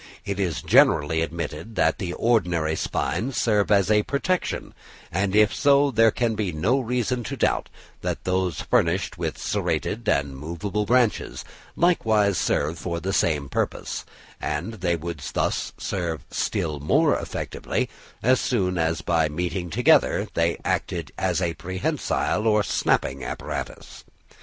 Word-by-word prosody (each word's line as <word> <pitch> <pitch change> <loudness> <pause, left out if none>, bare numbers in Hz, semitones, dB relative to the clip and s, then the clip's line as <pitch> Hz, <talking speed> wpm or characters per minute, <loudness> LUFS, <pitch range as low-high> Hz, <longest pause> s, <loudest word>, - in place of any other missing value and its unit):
It 100 -1 -3
is 90 -6 -1
generally 80 +2 +4
admitted 85 +5 -4
that 80 -3 +2
the 90 -2 -3
ordinary 90 -10 +1
spines 100 - -2
serve 105 -3 +2
as 100 -1 +4
a 105 0 +5
protection; 175 - -2 0.4
and 95 +2 0
if 105 -1 +5
so, 140 0 +4
there 115 -1 +5
can 115 +1 0
be 105 -4 -1
no 95 - +1
reason 125 0 -1
to - - -4
doubt - - +1 0.3
that - - -3
those 90 -2 0
furnished 85 0 +1
with 80 -3 -2
serrated 110 +1 -1
and 70 -1 +1
movable 85 +8 -3
branches 120 -2 +1 0.3
likewise 110 - +3
serve 80 +4 0
for 85 -2 -3
the 95 +3 -3
same 75 -7 +1
purpose; - - -2 0.4
and 75 +9 -3
they 90 -5 0
would 85 -1 -5 0.2
thus - - 0
serve 85 -4 -3
still 75 -3 -1
more 75 - +3
effectively - - -3 0.4
as 130 +2 +4
soon 90 -7 0
as 80 0 0
by 80 -3 +2
meeting 90 +3 -3
together - - +3
they 85 0 +1
acted - - -2
as - - 0
a 85 -1 0
prehensile 95 +5 -1
or 105 -1 +4
snapping 65 -7 0
apparatus. - - -6
90 Hz, 140 wpm, -24 LUFS, 80-110 Hz, 0.4 s, a